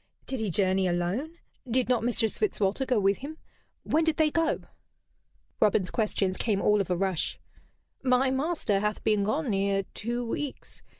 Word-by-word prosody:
"Did 265 - -3
he 220 -2 -1
journey 190 +1 +2
alone? 185 - -2 0.3
Did 250 +1 +2
not 245 -3 +2
Mistress 230 -2 +1
Fitzwalter 265 - 0
go 250 -4 +2
with 195 0 +2
him? 300 +4 -7 0.5
When 320 +2 +2
did 320 -1 +1
they 310 -2 +3
go?" 330 0 +1 1.0
Robin's 205 -3 +2
questions 200 -4 0
came 210 -4 0
all 210 0 +3
of 190 - -4
a 180 - +1
rush. 190 -3 -1 0.6
"My 260 0 +3
master 265 - 0
hath 210 +1 -2
been 210 -2 +2
gone 265 +5 0
near 195 0 +1
two 240 +2 -3
weeks. 280 +4 -5
220 Hz, 165 wpm, -28 LUFS, 195-265 Hz, 1.0 s, they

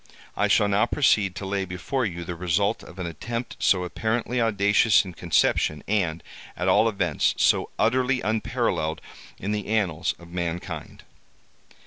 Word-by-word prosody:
I - - +2
shall 105 - +4
now 100 +3 +2
proceed 105 -10 +2
to 100 - -5
lay 100 0 -1
before 105 +8 -2
you 85 -3 -6
the 90 - -4
result 90 +3 0
of 90 - -13
an 90 - -4
attempt 115 +9 -5
so 90 -2 +3
apparently 115 +6 -1
audacious 105 -1 +3
in 90 - -8
conception, 75 -3 +1
and, 90 -6 0 0.3
at - - -2
all 115 - +4
events, 90 -8 0
so - - +3
utterly 130 0 +2
unparalleled 95 -7 -1 0.4
in 100 - -4
the 105 -1 -3
annals 95 -6 0
of 85 0 -15
mankind. 85 -1 -5
100 Hz, 150 wpm, -25 LUFS, 85-110 Hz, 0.4 s, shall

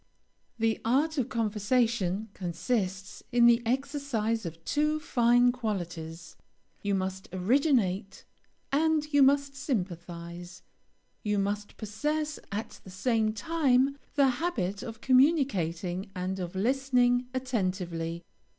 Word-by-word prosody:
The 225 -1 0
art 285 +6 +2
of 255 0 -1
conversation 220 -2 0
consists 190 +2 -3
in 240 -1 +5
the 235 0 +6
exercise 250 - -1
of 165 0 -10
two 300 +1 +1
fine 245 -4 +4
qualities. 175 -8 -5 0.5
You 200 -1 0
must 190 0 -3
originate, 200 - +1 0.5
and 310 +1 +2
you 285 - +5
must 280 +1 +4
sympathize; 175 - -5 0.6
you 210 -1 0
must 205 +1 -2
possess 295 +9 -2
at 210 +3 -5
the - - -12
same 220 +3 +1
time 270 +2 +2 0.2
the 280 -2 +5
habit 205 - -1
of 230 -2 -8
communicating 200 - +2
and 185 +1 -3
of 180 0 -5
listening 245 +2 +2
attentively. 185 -9 -2
225 Hz, 110 wpm, -29 LUFS, 190-265 Hz, 0.6 s, the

